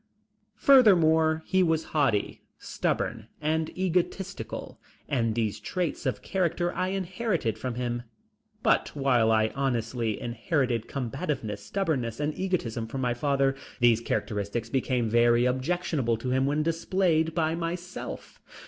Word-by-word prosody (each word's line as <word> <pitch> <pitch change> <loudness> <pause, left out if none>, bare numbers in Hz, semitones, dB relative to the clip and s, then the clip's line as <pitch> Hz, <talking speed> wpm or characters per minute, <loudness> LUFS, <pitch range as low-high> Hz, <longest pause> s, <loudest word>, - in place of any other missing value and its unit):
Furthermore, 160 - +5
he 190 - +2
was 160 -2 +2
haughty, 135 -9 +1 0.2
stubborn 110 -1 -2
and 155 +1 0
egotistical, 185 +1 -2 0.3
and 115 -6 0
these 110 -3 -1
traits 175 -6 -2
of 130 - -2
character 175 -1 0
I 185 - -1
inherited 185 - -1
from 125 0 -3
him. 120 -1 -2 0.6
But - - +3
while 125 -5 +3
I 110 0 +3
honestly 120 -4 -1
inherited 120 -1 -1
combativeness, 125 -5 -3
stubbornness 130 - -2
and 150 +1 -1
egotism 125 - -2
from 130 +3 -4
my 125 -1 +1
father, 135 +1 +1 0.2
these 120 -2 +4
characteristics 110 0 -2
became 125 -3 0
very 120 +1 +4
objectionable 130 -2 0
to 125 +3 -3
him 130 +1 +2
when 150 +2 +1
displayed 165 -1 +1
by 160 -2 +1
myself. 175 +2 -5
135 Hz, 125 wpm, -27 LUFS, 120-165 Hz, 0.6 s, Furthermore